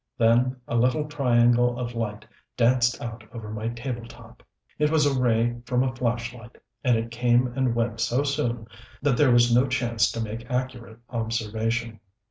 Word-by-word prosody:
Then 120 Hz, +3 st, +3 dB
a -, -, -2 dB
little 130 Hz, +6 st, +2 dB
triangle 120 Hz, -4 st, +3 dB
of 120 Hz, -1 st, -4 dB
light 110 Hz, -3 st, -4 dB, 0.3 s
danced 120 Hz, 0 st, +3 dB
out 115 Hz, -1 st, -6 dB
over 110 Hz, -3 st, -8 dB
my 110 Hz, +1 st, -4 dB
table 120 Hz, 0 st, -4 dB
top. -, -, -15 dB, 0.4 s
It 150 Hz, 0 st, +3 dB
was 155 Hz, -1 st, +3 dB
a 145 Hz, -, +2 dB
ray 120 Hz, -2 st, +1 dB
from 125 Hz, 0 st, +2 dB
a 130 Hz, -1 st, -1 dB
flashlight, 115 Hz, -1 st, -3 dB, 0.3 s
and 125 Hz, -2 st, +3 dB
it 115 Hz, +1 st, -4 dB
came 120 Hz, +1 st, +3 dB
and 130 Hz, -3 st, +1 dB
went 115 Hz, -1 st, -1 dB
so 125 Hz, +4 st, +1 dB
soon 130 Hz, -5 st, -1 dB, 0.4 s
that 140 Hz, -3 st, +3 dB
there 145 Hz, +1 st, +4 dB
was 120 Hz, 0 st, +5 dB
no 125 Hz, +3 st, +4 dB
chance 120 Hz, -4 st, +1 dB
to -, -, -4 dB
make 115 Hz, +2 st, -5 dB
accurate 125 Hz, -3 st, -4 dB
observation. 115 Hz, 0 st, -2 dB
120 Hz, 170 wpm, -25 LUFS, 115-125 Hz, 0.4 s, was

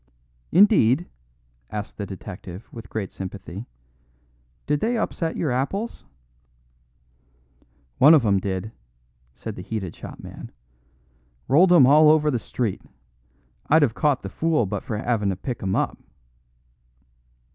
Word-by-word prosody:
"Indeed?" 175 Hz, -, +5 dB, 0.6 s
asked 105 Hz, 0 st, -6 dB
the 100 Hz, -, -4 dB
detective, 95 Hz, 0 st, -9 dB
with 115 Hz, -2 st, -10 dB
great 105 Hz, -4 st, -4 dB
sympathy. 95 Hz, +2 st, -8 dB, 1.0 s
"Did 150 Hz, -, 0 dB
they 235 Hz, +6 st, 0 dB
upset 165 Hz, -6 st, -2 dB
your 150 Hz, -, -1 dB
apples?" 195 Hz, -, -3 dB, 1.9 s
"One 155 Hz, +4 st, +8 dB
of 135 Hz, -7 st, +3 dB
'em 100 Hz, -2 st, +3 dB
did," 95 Hz, +2 st, -4 dB, 0.6 s
said -, -, -7 dB
the -, -, -7 dB
heated 95 Hz, -3 st, -5 dB
shopman; -, -, -10 dB, 1.0 s
"rolled 175 Hz, +7 st, +5 dB
'em 165 Hz, -7 st, +8 dB
all 150 Hz, +3 st, +7 dB
over 155 Hz, -1 st, +4 dB
the 125 Hz, -, 0 dB
street. 110 Hz, -3 st, -3 dB, 0.9 s
I'd 160 Hz, +1 st, +5 dB
'ave 120 Hz, -6 st, +2 dB
caught 145 Hz, 0 st, +1 dB
the 100 Hz, -, -5 dB
fool 155 Hz, +2 st, +1 dB
but 95 Hz, -, -3 dB
for 115 Hz, -4 st, -4 dB
havin' 110 Hz, -2 st, 0 dB
to 95 Hz, -, -1 dB
pick 120 Hz, +5 st, -5 dB
'em 95 Hz, -1 st, -1 dB
up." -, -, -1 dB
120 Hz, 130 wpm, -24 LUFS, 100-155 Hz, 1.9 s, One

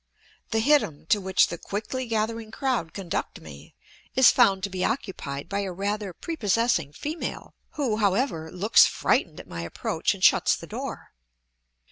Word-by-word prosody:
The 220 Hz, -1 st, +1 dB
hittim 230 Hz, -, +2 dB
to 210 Hz, -2 st, +3 dB
which 190 Hz, 0 st, +3 dB
the 170 Hz, -, -6 dB
quickly 230 Hz, +5 st, -4 dB
gathering 225 Hz, 0 st, -2 dB
crowd 235 Hz, -, -2 dB
conduct 190 Hz, -4 st, -4 dB
me 70 Hz, -2 st, -13 dB, 0.4 s
is 260 Hz, -1 st, +7 dB
found 195 Hz, -1 st, +3 dB
to 200 Hz, -, -1 dB
be 185 Hz, -1 st, -2 dB
occupied 170 Hz, -, -3 dB
by 200 Hz, +2 st, -2 dB
a 195 Hz, -2 st, -3 dB
rather 200 Hz, +2 st, -3 dB
prepossessing 230 Hz, -, 0 dB
female, 305 Hz, -, -5 dB, 0.2 s
who, 255 Hz, -8 st, -1 dB
however, 195 Hz, -, 0 dB
looks 205 Hz, +5 st, +5 dB
frightened 170 Hz, -, 0 dB
at -, -, -11 dB
my 85 Hz, -1 st, -6 dB
approach 85 Hz, -, -2 dB
and -, -, -10 dB
shuts -, -, +5 dB
the -, -, -9 dB
door. -, -, -7 dB
205 Hz, 155 wpm, -26 LUFS, 175-230 Hz, 0.4 s, is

